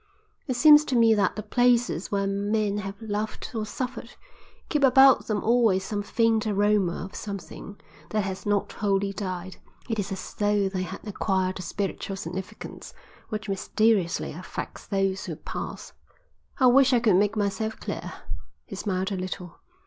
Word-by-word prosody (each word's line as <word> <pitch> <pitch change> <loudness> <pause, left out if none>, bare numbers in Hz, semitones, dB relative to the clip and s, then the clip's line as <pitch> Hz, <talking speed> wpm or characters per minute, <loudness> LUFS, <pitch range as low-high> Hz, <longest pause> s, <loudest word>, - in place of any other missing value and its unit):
It 255 - -1
seems 300 +4 +8
to 265 - -1
me 230 -1 +6
that 200 -3 +1
the 215 - -5
places 245 -7 +2
where 200 -1 +1
men 205 +1 0
have 195 0 -6
loved 215 0 -4
or 220 -2 -3
suffered 245 +2 -5 0.5
keep 295 -3 0
about 265 0 +6
them 210 -2 -1
always 225 -5 +3
some 205 +1 -3
faint 225 +1 +1
aroma 205 -4 +1
of 190 - -11
something 200 0 -7 0.3
that 215 -1 0
has 190 -1 -4
not 205 -1 0
wholly 200 -1 0
died. 185 -1 -5 0.3
It 225 -3 -2
is 200 0 -3
as 190 - -6
though 205 -1 +1
they 190 -1 -3
had 185 - -7
acquired 190 -2 -1
a - - -4
spiritual 195 +2 -3
significance 185 0 -7 0.3
which 215 -1 -4
mysteriously 200 -1 +1
affects 180 +5 -7
those 195 -1 0
who - - -5
pass. - - -7 0.6
I 260 - +3
wish 260 +1 +6
I 245 - +5
could 215 -6 +4
make 205 +2 +2
myself 215 +2 -1
clear." - - -5 0.5
He - - -8
smiled 190 -1 -2
a - - -1
little. 185 -1 -6
205 Hz, 165 wpm, -26 LUFS, 195-225 Hz, 0.6 s, seems